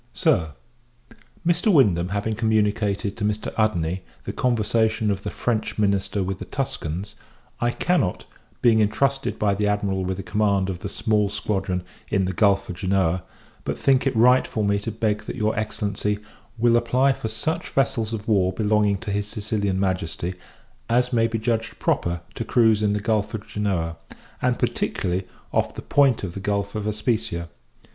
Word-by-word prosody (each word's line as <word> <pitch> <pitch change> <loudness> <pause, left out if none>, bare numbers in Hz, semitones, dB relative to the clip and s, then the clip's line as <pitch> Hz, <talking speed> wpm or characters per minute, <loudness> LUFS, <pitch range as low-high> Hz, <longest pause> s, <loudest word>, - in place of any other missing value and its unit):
SIR, 90 - +2 0.9
Mr. 175 +5 +3
Wyndham 95 - +4
having 105 +3 -1
communicated 105 -2 +1
to 110 - -4
Mr. 105 0 -1
Udney 90 -5 +1 0.2
the - - -5
conversation 110 -2 +1
of 95 -1 -2
the - - -4
French 115 -3 -2
minister 100 -1 +1
with 95 +1 -3
the - - -6
Tuscans, 100 - -4 0.5
I 120 - +2
cannot, 160 - 0 0.4
being 115 -3 +5
intrusted 135 +6 +1
by 105 -1 +2
the 105 +1 0
Admiral 100 -2 0
with 95 0 -2
the 95 - -5
command 100 -2 +1
of 90 - -6
the 100 - -5
small 105 -1 +1
squadron 95 -3 -2 0.3
in 95 -1 +2
the 95 - -2
Gulph 100 +1 +3
of 90 - -6
Genoa, 95 -2 +1 0.4
but - - -3
think 135 0 +3
it 135 - 0
right 125 +3 +5
for 110 - -2
me 100 0 +2
to 115 +3 -4
beg 110 -1 0
that - - -5
your 110 0 0
Excellency 105 -1 -1 0.4
will 120 +1 +4
apply 130 +3 +3
for 115 - -5
such 135 +9 -2
vessels 115 -5 0
of 110 -2 -5
war 95 -4 +3
belonging 105 0 +2
to 110 -3 -4
his 100 0 -1
Sicilian 100 -3 -1
Majesty, 90 -2 -1 0.6
as 125 +2 +2
may 115 -1 +4
be 115 0 -2
judged 115 0 -1
proper 85 0 0
to - - -3
cruize 110 -2 +3
in 105 -1 +2
the 105 - -1
Gulph 110 0 0
of 105 - -6
Genoa, 90 -6 -1 0.4
and - - +2
particularly 90 +1 -1 0.3
off - - +1
the - - -7
point 135 -6 +3
of 90 -3 -4
the 100 - -5
Gulph 100 0 -1
of 105 -1 -3
Especia. 105 -6 -1
105 Hz, 175 wpm, -24 LUFS, 95-115 Hz, 0.9 s, being